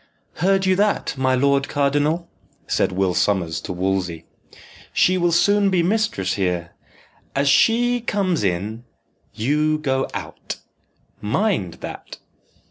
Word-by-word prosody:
"Heard 195 +2 +2
you 190 0 +3
that, 205 -6 +1
my 130 -1 +1
lord 140 +1 +2
cardinal?" 145 +4 +1 0.4
said - - 0
Will 95 0 0
Sommers 90 -4 0
to - - -6
Wolsey. 90 -2 -2 0.7
"She 185 - +3
will 175 -1 +2
soon 200 +4 +3
be 180 -3 +2
mistress 185 - 0
here. 90 -3 -2 0.6
As 140 +1 +1
she 240 - +3
comes 190 - 0
in, 100 +5 -2 0.5
you 150 +7 +1
go 135 -3 -1
out - - -6 0.7
mind 105 - 0
that!" - - -8
140 Hz, 125 wpm, -21 LUFS, -, 0.7 s, you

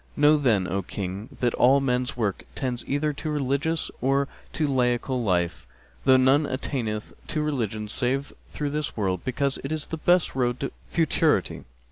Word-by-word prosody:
Know 150 +1 +6
then, 110 -10 +2
O 95 +3 -1
King, 95 +3 -5
that 120 -2 +2
all 135 +3 +5
men's 125 -2 0
works 105 -5 -1
tend 125 -3 -2
either 145 +2 0
to 155 +2 -5
religious 150 +3 0
or 135 +2 +2 0.3
to 155 - 0
laical 125 -1 +1
life, 85 -4 0 0.4
for 130 -1 +6
none 135 +3 +4
attaineth 120 -5 -3
to 155 -2 -1
religion 110 -8 -2
save 135 +5 -1 0.2
through 145 -1 -3
this 150 -3 -3
world, 95 -4 0
because 135 +2 -1
it 135 - -4
is 155 -2 -2
the 160 - -5
best 175 +2 +3
road 125 -1 0
to 140 - -2 0.2
futurity. 165 -3 +1
130 Hz, 165 wpm, -26 LUFS, 115-145 Hz, 0.4 s, Know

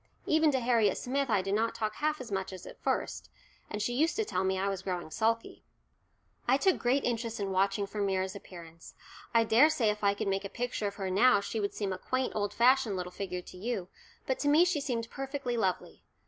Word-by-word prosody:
Even 315 0 +4
to 265 - +1
Harriet 235 -4 +2
Smith 275 +1 -1
I 205 -4 +2
did 195 - -2
not 225 +2 +1
talk 215 -1 -2
half 305 0 0
as 245 -4 -8
much 190 -1 -2
as 185 - -9
at - - -12
first, - - -2 0.4
and 210 0 -3
she 245 - -1
used 315 +7 +2
to 440 - 0
tell 185 - -1
me 190 0 +1
I 195 +1 0
was 195 -2 -2
growing 180 -4 -4
sulky. 230 +5 -1 0.8
I 255 +2 +5
took 380 +5 +2
great 260 +3 +2
interest 230 -1 -2
in 200 -1 -2
watching 195 +1 +1
for 205 +1 -5
Myra's 190 -1 0
appearance. 170 -4 -11 0.4
I 230 -1 +4
daresay 230 0 +4
if 210 0 -7
I 200 0 +3
could 205 - -3
make 195 0 0
a 200 - -5
picture 240 -2 -2
of 200 - -5
her 190 -2 -3
now 210 +4 +5
she 200 +2 -3
would 200 -1 -2
seem 200 -3 -2
a 185 - -6
quaint 255 +4 -2
old 205 -1 0
fashioned 245 -1 +3
little 180 0 -4
figure 180 -1 -5
to - - -12
you, 200 -2 -3 0.4
but 260 - -1
to 290 - -1
me 305 +4 +6
she 355 -5 0
seemed 235 -5 -2
perfectly 270 -2 -3
lovely. 190 -6 -2
215 Hz, 230 wpm, -30 LUFS, 195-255 Hz, 0.8 s, me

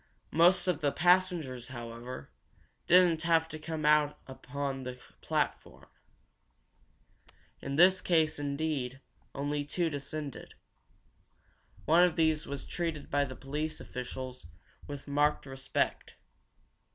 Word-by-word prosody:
Most 175 +4 +5
of 170 -4 0
the 145 -2 +2
passengers, 175 -8 +2
however, 120 0 -8 0.6
didn't 175 -2 +5
have 165 -1 +3
to 155 - -7
come 155 0 -4
out 150 -1 +4 0.3
on 140 -1 -2
the 125 -1 -7 0.2
platform. - - -2 1.8
In 140 - -4
this 185 +4 +6
case, 160 -4 +2
indeed, 140 -3 -2 0.4
only 145 +1 -1
two 165 +3 -1
descended. 145 0 -6 1.3
One 165 +4 +5
of 180 -2 +4
these 160 -2 +2
was 140 -1 -5
treated 165 -4 -4
by 145 0 +2
the 130 -1 -8
police 150 +4 -4
officials 125 -3 -7 0.4
with 145 -1 -7
marked 145 +1 +1
respect. 135 -1 -2
150 Hz, 115 wpm, -31 LUFS, 135-160 Hz, 1.8 s, this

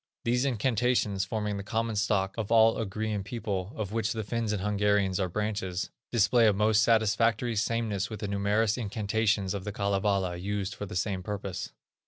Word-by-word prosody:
These 125 +3 +2
incantations, 120 -5 +1
forming 105 0 -2
the 100 - -5
common 115 +2 -1
stock 100 -2 +1
of 110 -2 -4
all 115 0 +5
Ugrian 105 -1 -2
peoples, 100 -3 -4
of 105 -3 -4
which 110 -1 0
the 110 -1 -3
Finns 115 0 -2
and 105 - -1
Hungarians 100 -2 +1
are 95 -2 0
branches, 100 -2 -2 0.2
display 115 +1 +4
a 105 - +4
most 105 +2 +3
satisfactory 115 +1 +2
sameness 110 -2 -1
with 110 - -7
the 105 - -2
numerous 100 +3 +1
incantations 105 -2 0
of 100 -2 -4
the 105 - -4
Kalevala 100 -2 0
used 100 +1 -3
for 105 - -6
the - - -7
same 95 +1 -1
purpose. 100 -1 -5
105 Hz, 175 wpm, -29 LUFS, 100-110 Hz, 0.2 s, all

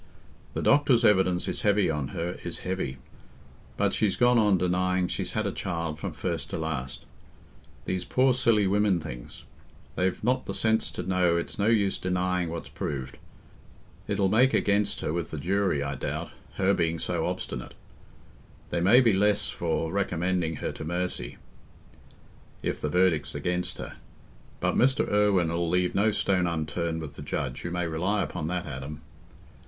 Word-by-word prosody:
The - - -2
doctors' 130 -5 +4
evidence 95 -4 +3
is - - -2
heavy 105 -1 +3
on 75 -4 -1
her—is 85 +2 -4
heavy. 90 -8 -2 0.8
But - - +1
she's 105 -3 +1
gone 120 -1 +4
on 105 -3 +4
denying 90 +1 +1
she's - - -3
had - - 0
a - - 0
child 85 -3 -3
from - - -4
first - - -3
to - - -3
last. 75 -5 -4 0.8
These 95 -1 -2
poor 130 0 +3
silly 115 -5 +3
women 100 -1 +2
things—they've 80 +7 -6
not 125 +3 +1
the 100 - -1
sense 110 +3 +2
to 90 - -4
know 90 -2 +2
it's 85 - -4
no 100 - +2
use 105 -4 +2
denying 90 -1 0
what's 85 0 -5
proved. 65 -2 -5 0.9
It'll 100 -1 +1
make 120 +7 +4
against 100 0 +1
her 75 - -2
with 85 -2 -2
the 80 - -5
jury, 95 -1 +1
I 70 0 -3
doubt, 65 - -4 0.2
her 100 0 +3
being 85 -2 0
so - - -1
obstinate: 60 - -5 1.0
they 85 - 0
may 110 +9 +7
be 115 -4 +4
less 105 +2 +2
for 80 -1 -1
recommending 90 -3 0
her - - -3
to - - -8
mercy, 85 -7 -3 1.3
if - - -2
the 75 - -1
verdict's 90 -2 +2
against 90 0 -2
her. - - -7 0.6
But - - +1
Mr. 130 +3 +3
Irwine 100 -5 +3
'ull 85 0 0
leave 90 +1 +1
no 105 +3 +3
stone 95 -3 +1
unturned 80 0 -2
with 75 -3 -8
the - - -7
judge—you 70 +4 -3
may 90 0 -1
rely 90 +5 0
upon 75 - -4
that, 90 +1 -2
Adam." 75 +1 -7
90 Hz, 160 wpm, -27 LUFS, 80-100 Hz, 1.3 s, may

